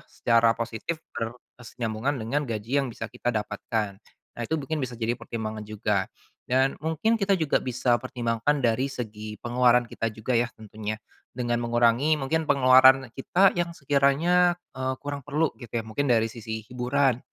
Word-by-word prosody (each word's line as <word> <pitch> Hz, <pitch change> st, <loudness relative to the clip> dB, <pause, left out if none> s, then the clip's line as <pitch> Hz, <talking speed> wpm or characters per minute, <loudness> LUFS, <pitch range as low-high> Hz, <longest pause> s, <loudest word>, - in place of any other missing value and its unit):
secara 115 Hz, -1 st, +3 dB
positif 120 Hz, +8 st, -4 dB, 0.2 s
berkesinambungan 120 Hz, +2 st, -4 dB
dengan 140 Hz, +7 st, -1 dB
gaji 115 Hz, +4 st, -2 dB
yang 135 Hz, -, -3 dB
bisa 110 Hz, -, -6 dB
kita 120 Hz, -, -2 dB
dapatkan. 105 Hz, -1 st, -2 dB, 0.4 s
Nah -, -, -7 dB
itu 160 Hz, -, -1 dB
mungkin 155 Hz, +3 st, -3 dB
bisa 125 Hz, -, -7 dB
jadi 115 Hz, +1 st, 0 dB
pertimbangan 110 Hz, -2 st, -5 dB
juga. 105 Hz, -2 st, -1 dB, 0.4 s
Dan, 130 Hz, +2 st, +2 dB
mungkin 160 Hz, +9 st, +1 dB
kita 195 Hz, 0 st, +3 dB
juga 155 Hz, -3 st, +2 dB
bisa 125 Hz, -1 st, +1 dB
pertimbangkan 125 Hz, +3 st, 0 dB
dari 120 Hz, +3 st, +2 dB
segi 110 Hz, -4 st, -6 dB
pengeluaran 120 Hz, 0 st, +3 dB
kita 115 Hz, 0 st, -2 dB
juga 110 Hz, +4 st, -3 dB
ya 120 Hz, 0 st, +2 dB
tentunya, 110 Hz, 0 st, -6 dB, 0.4 s
dengan 120 Hz, -1 st, -1 dB
mengurangi 120 Hz, +5 st, +3 dB
mungkin 160 Hz, +4 st, 0 dB
pengeluaran 130 Hz, -1 st, +6 dB
kita 185 Hz, +8 st, +3 dB
yang 170 Hz, -1 st, -2 dB
sekiranya, 155 Hz, +6 st, +3 dB, 0.2 s
eee, 130 Hz, 0 st, -1 dB
kurang 145 Hz, 0 st, -4 dB
perlu 150 Hz, +2 st, +1 dB
gitu 120 Hz, -, -9 dB
ya, 110 Hz, -, -9 dB
mungkin 140 Hz, +6 st, -2 dB
dari 115 Hz, -1 st, +3 dB
sisi 110 Hz, -1 st, -6 dB
hiburan. 125 Hz, +1 st, +1 dB
125 Hz, 155 wpm, -26 LUFS, 115-140 Hz, 0.4 s, pengeluaran